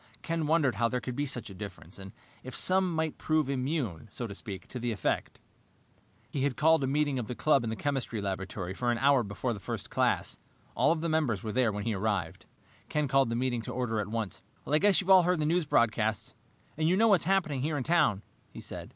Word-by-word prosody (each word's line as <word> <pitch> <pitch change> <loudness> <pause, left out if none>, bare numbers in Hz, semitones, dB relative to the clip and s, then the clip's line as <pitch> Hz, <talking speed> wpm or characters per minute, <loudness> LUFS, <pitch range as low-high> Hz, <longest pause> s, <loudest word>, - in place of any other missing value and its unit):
Ken 165 -2 -1
wondered 150 -8 +2
how 115 +2 +3
there 125 - -1
could 125 0 -5
be 145 +2 -1
such 120 -5 -5
a - - -8
difference, 95 -2 -8
and 95 0 -9 0.3
if 130 - -6
some 185 -2 +2
might 160 -1 -2
prove 155 -3 +1
immune, 130 - -2
so 120 - -5
to 100 - -6
speak, 100 -2 -7
to 125 - -5
the 120 0 -1
effect. 105 - -2 0.9
He 140 - -2
had 135 -2 0
called 160 -1 +4
a - - +1
meeting 145 -1 +1
of 115 - -4
the 125 - -4
club 140 -2 +3
in 115 - -2
the 110 - -2
chemistry 135 -4 -2
laboratory 95 -1 -4
for 120 +5 -1
an 120 - 0
hour 140 +1 +4
before 115 +3 -3
the 105 - -7
first - - -6
class. - - 0 0.4
All - - +4
of 165 -1 0
the 170 - -1
members 145 -11 0
were 110 - -3
there 120 -1 +2
when 105 0 -4
he 115 - -1
arrived. 100 -5 -2 0.4
Ken 150 -1 0
called 135 -2 +3
the 115 - -1
meeting 120 -1 0
to - - -6
order 120 -3 -1
at 105 - -2
once. 110 -4 -3 0.2
"I 150 +2 +2
guess 200 0 +4
you've 190 - -7
all 190 -1 +9
heard 180 +1 +2
the 150 - +1
news 170 +2 +1
broadcasts, 110 -4 +1 0.4
and 155 +1 +2
you 185 - +3
know 225 +2 +5
what's 195 -5 +4
happening 170 -8 +1
here 150 +2 -1
in 130 - -2
town," 150 - +2 0.3
he - - -10
said. - - -7
130 Hz, 235 wpm, -30 LUFS, 110-155 Hz, 0.9 s, all